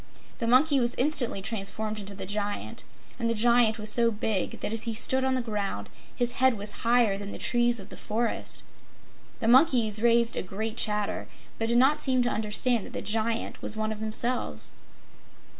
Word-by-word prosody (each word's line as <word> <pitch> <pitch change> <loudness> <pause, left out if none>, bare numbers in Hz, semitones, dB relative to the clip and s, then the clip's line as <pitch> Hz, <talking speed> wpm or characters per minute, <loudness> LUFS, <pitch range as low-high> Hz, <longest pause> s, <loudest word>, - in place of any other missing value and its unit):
The 230 - -2
monkey 275 +4 +4
was 240 -1 +1
instantly 250 -8 +3
transformed 215 0 -3
into 200 0 -6
the 190 - -6
Giant, 205 +1 -4 0.4
and 230 -1 0
the 230 - 0
Giant 235 0 +3
was 215 -1 -1
so 235 +1 +3
big 210 -3 -1
that 210 - -3
as 225 +1 -2
he 230 -1 -3
stood 260 +4 +2
on 265 0 +1
the 255 - -1
ground 200 - -4 0.2
his 245 0 0
head 260 -1 +2
was 205 0 -3
higher 230 -4 +2
than 200 0 -7
the - - -7
trees 240 -1 +1
of 195 +1 -11
the - - -10
forest. 230 +2 -3 0.8
The 225 - 0
monkeys 240 -5 +4
raised 235 0 +3
a - - -1
great 215 +4 -5
chatter 210 -1 0 0.3
but 225 0 -1
did 235 - +3
not 285 +4 +3
seem 255 -2 +2
to 240 - 0
understand 220 +2 0
that - - -13
the - - -4
Giant 225 +2 -2
was 220 - +1
one 215 0 -1
of 215 - -6
themselves. 220 +3 -1
225 Hz, 190 wpm, -27 LUFS, 210-245 Hz, 0.8 s, monkey